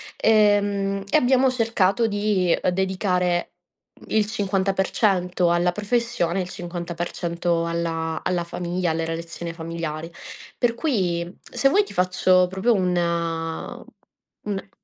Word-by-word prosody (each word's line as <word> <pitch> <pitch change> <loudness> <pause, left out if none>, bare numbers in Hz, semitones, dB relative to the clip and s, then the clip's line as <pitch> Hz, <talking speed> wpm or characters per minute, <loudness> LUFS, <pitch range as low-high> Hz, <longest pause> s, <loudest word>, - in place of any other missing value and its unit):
e, 210 -2 +5
mhmm, 200 -1 -2
e - - +6
abbiamo 260 -1 +3
cercato 225 -3 +2
di, 205 -3 0
ehm, 180 - +1
dedicare 180 -2 0 0.6
il 215 -1 +2
50% 190 -3 +1
alla 175 +1 +2
professione 210 -4 0
e - - +1
il 180 - -8
50% 170 -1 -3
alla 165 -1 -2
alla 175 -1 0
famiglia, 175 0 -2
alle 165 +1 -1
relazione 165 +1 -5
familiare; 165 -1 -5 0.5
per 235 -1 +1
cui, 185 - -1
se 275 - +1
vuoi 410 +7 +4
ti - - -11
faccio 185 0 +3
proprio 190 +6 +1
un 185 -4 +1
mhmm, 170 -2 -2 0.6
un 195 -1 -4
180 Hz, 125 wpm, -23 LUFS, 170-205 Hz, 0.6 s, e